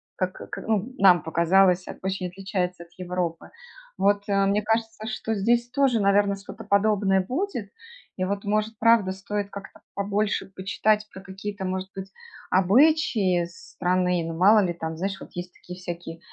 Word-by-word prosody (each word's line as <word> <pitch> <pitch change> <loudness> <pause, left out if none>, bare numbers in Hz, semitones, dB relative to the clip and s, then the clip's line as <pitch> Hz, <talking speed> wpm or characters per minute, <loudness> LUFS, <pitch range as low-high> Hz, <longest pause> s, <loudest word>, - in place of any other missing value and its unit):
как 185 0 -4
ка - - -5
ну, 220 +3 0
нам 180 -5 +6
показалось, 180 +3 +3 0.2
очень 190 -1 -2
отличается 180 -1 -3
от 170 - -21
Европы. 180 -2 -3 0.5
Вот, 205 0 +2
э. 195 0 +3
Мне 200 +2 +2
кажется, 225 0 -2
что 220 0 -3
здесь 235 +4 +1
тоже, 270 -5 +2
наверное, 200 0 +3
что-то 195 - -10
подобное 200 -1 +2
будет. 250 - -3 0.5
И 185 - -1
вот, 200 +1 -3
может, 215 +1 -1
правда, 230 -4 +4
стоит 200 +1 -4
как-то 200 -1 -10
побольше 205 +1 -1
почитать 210 +2 +1
про 190 - -10
какие-то, 195 +1 -6
может 185 0 -3
быть, 195 0 -7 0.4
обычаи 195 - +3
страны. 180 0 -1
Ну, 165 0 -4
мало 210 +4 +6
ли 180 -3 +1
там, 160 -1 -5
знаешь, 195 +2 -3
вот - - -11
есть 175 0 -6
такие 180 +1 -11
всякие 170 -2 -7
195 Hz, 160 wpm, -25 LUFS, 185-210 Hz, 0.5 s, нам